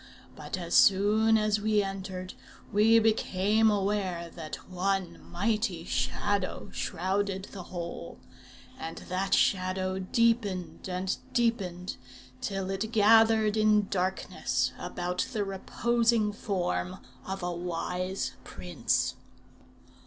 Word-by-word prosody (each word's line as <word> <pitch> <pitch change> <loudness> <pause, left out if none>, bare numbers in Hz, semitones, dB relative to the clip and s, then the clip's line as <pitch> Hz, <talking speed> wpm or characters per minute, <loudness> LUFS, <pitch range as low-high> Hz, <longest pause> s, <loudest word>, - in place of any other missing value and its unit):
But - - -5
as 175 -1 -5
soon 215 +3 +5
as 215 -1 +1
we 210 -1 +2
entered, 190 -1 -5 0.4
we 220 +2 +6
became 220 -1 +3
aware 195 -4 -1
that 155 -2 -6
one 185 -1 -1
mighty 205 -3 0
Shadow 185 +10 -1
shrouded 195 +2 -2
the 195 - -7
whole; 170 - -6 0.6
and 165 0 -6
that 185 +2 +1
Shadow 185 0 +1
deepened 200 -3 0
and 185 +1 -1 0.2
deepened, 195 -7 0 0.4
till 195 -1 -2
it 205 +3 -2
gathered 220 0 +5
in 215 -2 +3
darkness 185 0 -1
about 180 0 -2
the 215 -3 0
reposing 225 +2 +1
form 90 - -2 0.3
of 190 -1 -5
a 175 - -1
wise 180 +2 -3
prince. - - -1
195 Hz, 105 wpm, -29 LUFS, 180-215 Hz, 0.6 s, we